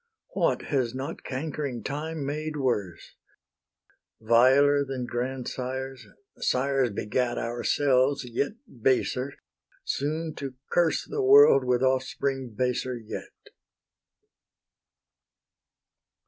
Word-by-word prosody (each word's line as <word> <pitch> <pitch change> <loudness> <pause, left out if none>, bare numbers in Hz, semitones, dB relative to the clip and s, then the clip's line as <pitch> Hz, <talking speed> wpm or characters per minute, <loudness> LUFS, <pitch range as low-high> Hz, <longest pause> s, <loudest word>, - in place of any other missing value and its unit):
What - - +1
has 130 -4 -1
not 135 +5 -5
cankering 140 -2 -4
Time 150 +1 -4
made 150 +2 -3
worse? 105 - -2 1.1
Viler 130 +6 +5
than 135 -2 -4
grandsires, 130 +1 -4 0.3
sires 135 - +1
beget 120 +4 -1
Ourselves, 130 +3 +1
yet 125 - -2 0.3
baser, 130 +2 +1 0.5
soon 155 +3 -2
to 135 -2 -6 0.2
curse 170 -2 +2
The 430 -1 -3
world 410 - +7
with 125 0 +1
offspring 130 -1 -1
baser 125 0 -1
yet. 110 -2 -9
130 Hz, 90 wpm, -27 LUFS, 125-145 Hz, 1.1 s, world